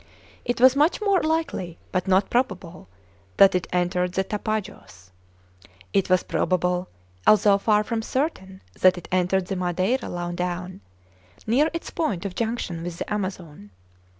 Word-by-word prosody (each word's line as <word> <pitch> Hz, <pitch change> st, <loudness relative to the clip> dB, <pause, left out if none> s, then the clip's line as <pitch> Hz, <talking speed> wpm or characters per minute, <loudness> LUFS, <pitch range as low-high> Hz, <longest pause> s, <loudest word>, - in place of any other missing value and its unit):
It 245 Hz, 0 st, -1 dB
was 260 Hz, +1 st, +6 dB
much 300 Hz, +4 st, +3 dB
more 400 Hz, -3 st, +2 dB
likely, 310 Hz, -, -2 dB
but 185 Hz, 0 st, -1 dB
not 190 Hz, +1 st, +2 dB
probable, 185 Hz, -, -2 dB, 0.5 s
that 195 Hz, -1 st, +7 dB
it 180 Hz, -1 st, -1 dB
entered 180 Hz, 0 st, 0 dB
the 190 Hz, -, +1 dB
Tapajos. 205 Hz, -, -5 dB, 0.8 s
It 195 Hz, -1 st, +1 dB
was 185 Hz, 0 st, +3 dB
probable, 180 Hz, 0 st, 0 dB, 0.4 s
although 205 Hz, -1 st, +5 dB
far 210 Hz, 0 st, +3 dB
from 225 Hz, +1 st, -2 dB
certain, 220 Hz, -, -3 dB, 0.2 s
that 185 Hz, -1 st, +5 dB
it 175 Hz, -, -9 dB
entered 185 Hz, +1 st, +1 dB
the 195 Hz, -, -4 dB
Madeira 185 Hz, +7 st, -1 dB
low 175 Hz, 0 st, -4 dB
down, 180 Hz, -, -4 dB, 0.6 s
near 270 Hz, +8 st, +3 dB
its 335 Hz, -, -6 dB
point 205 Hz, -, -2 dB
of 195 Hz, -, -3 dB
junction 220 Hz, -6 st, -3 dB
with 170 Hz, 0 st, -6 dB
the -, -, -4 dB
Amazon. 180 Hz, -, -5 dB
190 Hz, 150 wpm, -24 LUFS, 180-225 Hz, 0.8 s, that